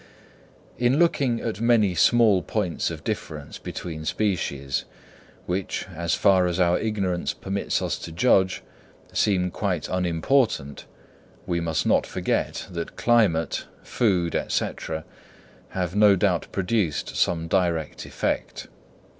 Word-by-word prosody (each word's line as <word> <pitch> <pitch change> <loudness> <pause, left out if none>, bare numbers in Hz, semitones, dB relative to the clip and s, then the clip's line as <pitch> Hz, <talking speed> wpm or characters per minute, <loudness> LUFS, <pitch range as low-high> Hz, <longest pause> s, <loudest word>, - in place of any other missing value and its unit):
In 125 +3 +3
looking 140 -8 +2
at 110 -2 -4
many 115 -5 +4
small 105 +1 +4
points 95 -5 -1
of - - -7
difference 75 -2 -5
between 80 -3 -6
species, 80 -8 -1 0.6
which, 90 +1 -2
as 85 0 0
far 95 -2 +4
as 90 +1 -2
our 90 -1 +3
ignorance 100 -5 -1
permits 100 +1 -2
us - - -2
to 85 - -7
judge, 95 +1 +2 0.5
seem 90 -3 +2
quite 90 -6 -2
unimportant, 90 - 0 0.6
we 85 -1 -1
must 80 -2 -1
not - - +3
forget - - -2
that 85 -1 -5
climate, 100 - +2 0.2
food, 90 -7 +1
&c., - - 0 1.0
have 90 0 -3
no 105 -1 +6
doubt 90 - +1
produced 95 -4 -1
some 85 -1 +1
direct 85 -3 0
effect. - - -3
90 Hz, 120 wpm, -25 LUFS, 85-105 Hz, 1.0 s, no